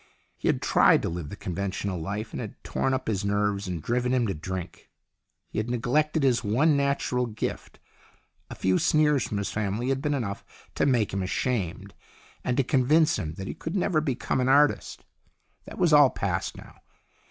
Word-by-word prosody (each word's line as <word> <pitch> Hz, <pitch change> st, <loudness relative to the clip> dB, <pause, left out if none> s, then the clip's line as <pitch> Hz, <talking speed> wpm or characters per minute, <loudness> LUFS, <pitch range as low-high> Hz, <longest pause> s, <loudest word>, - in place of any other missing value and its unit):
He -, -, -4 dB
had -, -, +1 dB
tried -, -, +4 dB
to -, -, -1 dB
live 85 Hz, -3 st, -5 dB
the -, -, -7 dB
con 95 Hz, -3 st, -6 dB
ventional 95 Hz, -1 st, -3 dB
life, 105 Hz, +6 st, -4 dB
and -, -, -4 dB
it -, -, -4 dB
had -, -, -46 dB
torn 135 Hz, -, -1 dB
up 130 Hz, 0 st, -2 dB
his 105 Hz, -3 st, -1 dB
nerves 100 Hz, 0 st, 0 dB
and 85 Hz, -4 st, -4 dB
driven 125 Hz, +1 st, 0 dB
him 125 Hz, -2 st, +2 dB
to 100 Hz, -, -1 dB
drink. 90 Hz, +3 st, -7 dB, 0.6 s
He -, -, -2 dB
had 110 Hz, +2 st, -3 dB
neglected, 145 Hz, +6 st, +1 dB
his 125 Hz, -2 st, +2 dB
one 135 Hz, +9 st, +3 dB
natural 140 Hz, -3 st, 0 dB
gift. 110 Hz, 0 st, -5 dB, 0.7 s
A -, -, -7 dB
few 95 Hz, 0 st, +1 dB
sneers 150 Hz, -4 st, +3 dB
from 105 Hz, -, -3 dB
his 100 Hz, -, -2 dB
family 105 Hz, +4 st, -2 dB
had 135 Hz, 0 st, 0 dB
been 145 Hz, -1 st, 0 dB
enough 100 Hz, -7 st, -4 dB, 0.3 s
to -, -, +1 dB
make 120 Hz, -8 st, +1 dB
him 95 Hz, -, -1 dB
ashamed, 95 Hz, -1 st, -2 dB, 0.5 s
and 125 Hz, -, -1 dB
to 135 Hz, -, +4 dB
convince 145 Hz, +5 st, +3 dB
him 80 Hz, 0 st, -4 dB
that 95 Hz, -, -6 dB
he -, -, -4 dB
could 160 Hz, -, -6 dB
never 180 Hz, -4 st, +1 dB
become 135 Hz, -3 st, -1 dB
an 125 Hz, -, +1 dB
artist. 145 Hz, +2 st, +2 dB, 0.6 s
That -, -, -10 dB
was 170 Hz, -3 st, +3 dB
all 145 Hz, -2 st, +8 dB
past 95 Hz, -7 st, -3 dB
now. -, -, -14 dB
120 Hz, 200 wpm, -26 LUFS, 100-135 Hz, 0.7 s, all